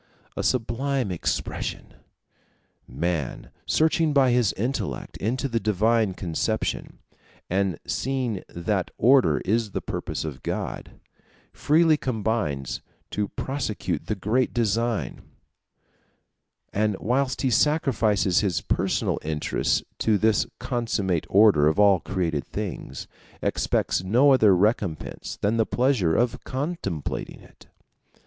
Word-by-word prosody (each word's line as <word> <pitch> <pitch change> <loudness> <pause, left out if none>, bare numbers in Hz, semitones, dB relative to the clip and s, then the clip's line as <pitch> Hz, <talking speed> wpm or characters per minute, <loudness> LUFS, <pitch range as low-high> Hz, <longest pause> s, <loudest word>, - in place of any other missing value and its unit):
A - - -2
sublime 130 -1 0
expression! 85 - -3 0.9
Man, 75 0 -3 0.2
searching 160 -1 +2
by 135 -3 +4
his 120 -4 +3
intellect 105 - -3
into 125 +7 -1
the 115 -3 -1
divine 110 0 +2
conception, 85 -4 -2 0.5
and 95 -3 0
seeing 130 -6 -2
that 90 +2 -2
order 130 +3 +4
is 110 +1 0
the - - -1
purpose - - -4
of 70 -5 -6
God, - - -5 0.5
freely 160 +1 +3
combines 110 - -2 0.3
to 105 0 -1
prosecute 130 -1 -3
the 110 - -1
great 110 +8 0
design; 115 0 0 1.5
and 105 -1 +1
whilst 130 +4 0
he 130 - +2
sacrifices 115 - +2
his 95 -6 0
personal - - 0
interests 75 -1 0 0.2
to 110 -2 +3
this 110 0 +2
consummate 105 - -1
order 95 -8 +5
of 80 +5 +1
all 100 -3 +6
created 80 -4 -2
things, 65 - -5 0.4
expects - - 0
no 125 +9 +5
other 110 -7 +5
recompense 95 -5 -1
than 105 +3 +1
the 110 - +3
pleasure 120 -11 +2
of 120 0 0
contemplating 130 - -4
it. - - -19
110 Hz, 110 wpm, -25 LUFS, 95-125 Hz, 1.5 s, all